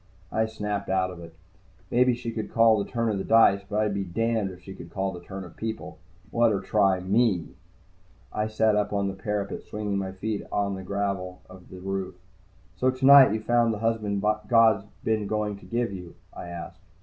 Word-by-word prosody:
I 110 Hz, 0 st, +1 dB
snapped 105 Hz, -2 st, -4 dB
out 95 Hz, -1 st, +1 dB
of 90 Hz, -, -10 dB
it. 85 Hz, -1 st, -11 dB, 0.6 s
Maybe 125 Hz, 0 st, +4 dB
she 120 Hz, -1 st, -5 dB
could 110 Hz, -1 st, -5 dB
call 115 Hz, -2 st, +4 dB
the -, -, -11 dB
turn 115 Hz, -2 st, -1 dB
of 100 Hz, -3 st, -2 dB
dice. 110 Hz, -3 st, +5 dB
But 105 Hz, +1 st, 0 dB
I'd 105 Hz, -1 st, 0 dB
be 100 Hz, 0 st, -1 dB
damned 110 Hz, +2 st, -1 dB
if 90 Hz, -1 st, -12 dB
she 95 Hz, -, -9 dB
could 85 Hz, -, -11 dB
call 95 Hz, +2 st, -2 dB
the 90 Hz, -, -8 dB
turn 95 Hz, +2 st, -8 dB
of 90 Hz, -, -12 dB
people. 110 Hz, 0 st, -6 dB, 0.3 s
Let 115 Hz, -1 st, +4 dB
her 100 Hz, -, 0 dB
try 95 Hz, -1 st, +2 dB
me. 95 Hz, -3 st, +1 dB, 0.8 s
I 105 Hz, 0 st, -1 dB
sat 110 Hz, 0 st, +2 dB
up 105 Hz, 0 st, 0 dB
on 100 Hz, -1 st, 0 dB
the -, -, -4 dB
parapet, 100 Hz, +1 st, -3 dB
swinging 105 Hz, -1 st, -5 dB
to -, -, -2 dB
put -, -, -4 dB
my 95 Hz, -, -5 dB
feet 105 Hz, +2 st, -3 dB
on 100 Hz, -1 st, 0 dB
the 95 Hz, -, -5 dB
gravel 95 Hz, -2 st, -3 dB
of 95 Hz, 0 st, -14 dB
the 95 Hz, -, -10 dB
root. 95 Hz, -1 st, -4 dB, 0.6 s
"So 130 Hz, +6 st, +2 dB
tonight 130 Hz, -1 st, +7 dB
you 110 Hz, +1 st, -1 dB
found 115 Hz, 0 st, +2 dB
the -, -, -6 dB
husband 105 Hz, -2 st, -1 dB, 0.2 s
God's 110 Hz, -4 st, +4 dB, 0.2 s
been 110 Hz, -2 st, 0 dB
going 105 Hz, -1 st, -1 dB
to -, -, -15 dB
give 120 Hz, -3 st, -1 dB
you?" 90 Hz, -3 st, -9 dB, 0.2 s
I -, -, -8 dB
asked. 85 Hz, +2 st, -8 dB
105 Hz, 210 wpm, -26 LUFS, 95-110 Hz, 0.8 s, tonight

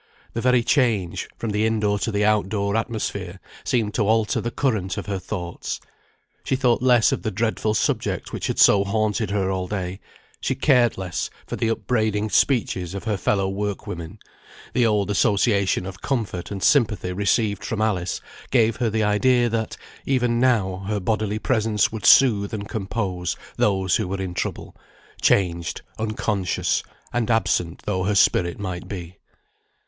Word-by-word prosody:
The 115 Hz, -, -2 dB
very 125 Hz, -1 st, +3 dB
change, 115 Hz, -, +1 dB
from 115 Hz, -, -3 dB
the 105 Hz, +1 st, 0 dB
in 110 Hz, 0 st, +1 dB
door 105 Hz, -1 st, +1 dB
to 115 Hz, -, -1 dB
the 105 Hz, 0 st, +1 dB
out 105 Hz, -3 st, +2 dB
door 100 Hz, -1 st, -1 dB
atmosphere, 100 Hz, -5 st, -3 dB, 0.2 s
seemed 110 Hz, -4 st, 0 dB
to 105 Hz, -3 st, +1 dB
alter 110 Hz, +2 st, +2 dB
the 120 Hz, -, -2 dB
current 110 Hz, -9 st, -1 dB
of -, -, -4 dB
her 100 Hz, -2 st, -3 dB
thoughts. 90 Hz, -2 st, -5 dB, 0.6 s
She -, -, 0 dB
thought 125 Hz, -3 st, +2 dB
less 125 Hz, -3 st, +4 dB
of -, -, -1 dB
the -, -, -2 dB
dreadful 110 Hz, +1 st, -1 dB
subject -, -, -1 dB
which -, -, -3 dB
had -, -, -2 dB
so 100 Hz, -1 st, +6 dB
haunted 110 Hz, +1 st, 0 dB
her 100 Hz, -2 st, 0 dB
all 95 Hz, -1 st, -2 dB
day; 95 Hz, -2 st, -4 dB, 0.4 s
she 130 Hz, -, -1 dB
cared 125 Hz, -4 st, +3 dB
less 95 Hz, -2 st, -3 dB, 0.2 s
for -, -, -5 dB
the 115 Hz, -, -1 dB
upbraiding 110 Hz, -2 st, 0 dB
speeches 95 Hz, -9 st, +1 dB
of 100 Hz, -, -5 dB
her 110 Hz, -1 st, 0 dB
fellow 95 Hz, 0 st, 0 dB
work 100 Hz, +1 st, -3 dB
women; 85 Hz, +4 st, -7 dB, 0.6 s
the 120 Hz, -2 st, +3 dB
old 105 Hz, -2 st, +1 dB
association 100 Hz, -1 st, +2 dB
of 95 Hz, 0 st, -8 dB
comfort 110 Hz, -9 st, -2 dB
and 100 Hz, -2 st, -5 dB
sympathy 105 Hz, -9 st, +2 dB
received 100 Hz, +1 st, +1 dB
from 110 Hz, -, -3 dB
Alice 95 Hz, -5 st, -1 dB, 0.3 s
gave 115 Hz, -4 st, +3 dB
her 120 Hz, -, +1 dB
the 110 Hz, 0 st, 0 dB
idea 120 Hz, +4 st, +3 dB
that, 110 Hz, -1 st, -2 dB, 0.3 s
even 125 Hz, -3 st, +1 dB
now, 100 Hz, -7 st, +1 dB
her 105 Hz, 0 st, -1 dB
bodily 110 Hz, +1 st, -1 dB
presence 110 Hz, -3 st, +1 dB
would 110 Hz, -3 st, -2 dB
soothe 110 Hz, -6 st, +5 dB
and 100 Hz, -1 st, -5 dB
compose 95 Hz, -4 st, -3 dB, 0.2 s
those 95 Hz, -1 st, +2 dB
who 110 Hz, -5 st, -2 dB
were 95 Hz, +1 st, -3 dB
in 95 Hz, -2 st, -4 dB
trouble, -, -, -4 dB, 0.5 s
changed, 85 Hz, -4 st, +1 dB, 0.2 s
unconscious, 105 Hz, -3 st, -1 dB, 0.3 s
and 120 Hz, -2 st, 0 dB
absent 90 Hz, -7 st, 0 dB
though 95 Hz, -3 st, -1 dB
her 105 Hz, +1 st, +1 dB
spirit 85 Hz, -3 st, +3 dB
might 95 Hz, -3 st, -5 dB
be. 90 Hz, -2 st, -8 dB
105 Hz, 170 wpm, -23 LUFS, 95-115 Hz, 0.6 s, so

